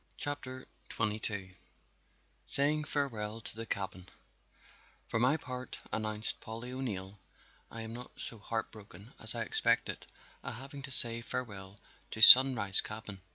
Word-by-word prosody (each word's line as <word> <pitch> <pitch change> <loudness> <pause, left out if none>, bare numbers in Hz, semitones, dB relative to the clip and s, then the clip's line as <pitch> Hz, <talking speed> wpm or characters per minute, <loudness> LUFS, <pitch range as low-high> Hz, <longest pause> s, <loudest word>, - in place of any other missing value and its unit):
CHAPTER 130 -3 -8 0.2
XXII 105 -3 +1 0.9
Saying 150 +2 -2
Farewell 115 -7 -5
to - - -3
the 115 0 -9
Cabin 95 -2 -7 1.0
"For 115 - -3
my 130 +6 0
part," 125 -4 -10 0.2
announced 110 0 -5
Polly 115 +3 -10
O'Neill, 105 -7 -8 0.5
"I 115 - -10
am 110 0 -10
not 125 +1 -13
so 115 - -6
heart 110 +2 -6
broken 105 0 -16
as - - +4
I - - -4
expected - - -1 0.4
at - - -8
having 135 +3 -12
to 135 0 -8
say 115 -2 +10
farewell 100 -6 -9 0.3
to 110 - -9
Sunrise 125 -7 +7
cabin. 105 -3 -10
115 Hz, 135 wpm, -29 LUFS, 105-130 Hz, 1.0 s, say